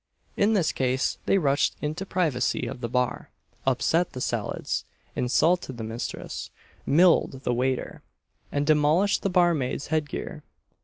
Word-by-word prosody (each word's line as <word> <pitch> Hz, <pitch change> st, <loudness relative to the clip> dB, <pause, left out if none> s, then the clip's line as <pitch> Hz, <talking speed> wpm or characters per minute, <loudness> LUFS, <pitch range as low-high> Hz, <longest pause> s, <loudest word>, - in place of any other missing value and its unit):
In 210 Hz, +2 st, +3 dB
this 180 Hz, -7 st, +2 dB
state 130 Hz, 0 st, 0 dB
they 195 Hz, -, +4 dB
rushed 140 Hz, -6 st, +2 dB
into 155 Hz, +6 st, -3 dB
the -, -, -31 dB
privacy 150 Hz, -9 st, 0 dB
of -, -, -6 dB
the 115 Hz, -, -3 dB
bar, 125 Hz, +1 st, -1 dB, 0.4 s
upset 165 Hz, +7 st, +2 dB
the 125 Hz, -, -5 dB
salads, -, -, -2 dB, 0.3 s
insulted 135 Hz, +2 st, +1 dB
the 115 Hz, -, -5 dB
mistress, 115 Hz, +2 st, -5 dB, 0.4 s
milled 165 Hz, -4 st, +4 dB
the 125 Hz, -, 0 dB
waiter, 130 Hz, +1 st, -1 dB, 0.5 s
and 145 Hz, 0 st, 0 dB
demolished 155 Hz, +6 st, +3 dB
the 195 Hz, -, 0 dB
barmaid's 170 Hz, -8 st, +1 dB
head 155 Hz, -2 st, +1 dB
gear. -, -, -6 dB
145 Hz, 145 wpm, -26 LUFS, 125-175 Hz, 0.5 s, they